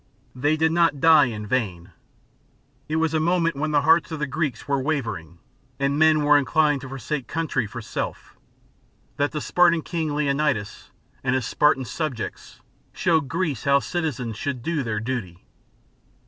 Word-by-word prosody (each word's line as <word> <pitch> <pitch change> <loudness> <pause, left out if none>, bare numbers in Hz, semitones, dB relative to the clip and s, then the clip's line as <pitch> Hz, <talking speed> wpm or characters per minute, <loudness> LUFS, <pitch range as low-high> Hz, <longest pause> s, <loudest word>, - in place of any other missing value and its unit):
They 145 +5 +1
did 160 +1 +2
not 165 -4 +2
die 160 -1 +6
in 110 -4 -5
vain. 100 -7 -2 1.0
It 155 - -1
was 160 0 +1
a 160 - +2
moment 170 0 +1
when 155 +3 -2
the 145 -1 +2
hearts 165 +3 +4
of 160 - -3
the 150 - -1
Greeks 140 -3 -3
were 140 -1 0
wavering 115 - -3 0.4
and 140 +1 0
men 155 -1 +4
were 145 0 +6
inclined 150 0 +2
to 135 - -8
forsake 135 +1 -4
country 160 -8 -1
for 115 +3 -8
self, - - -5 0.8
that 145 0 +1
the 150 - -3
Spartan 170 -1 +3
King 160 -4 -2
Leonidas 140 -7 -1 0.3
and 130 0 +1
his 130 -4 -1
Spartan 140 -1 +2
subjects, 140 -3 -5 0.3
showed 160 -6 +1
Greece 160 -3 -2
how 140 0 +5
citizens 140 - -3
should 130 -2 -4
do 165 -1 -1
their 110 -4 -2
duty. 110 -7 -5
145 Hz, 160 wpm, -24 LUFS, 125-160 Hz, 1.0 s, die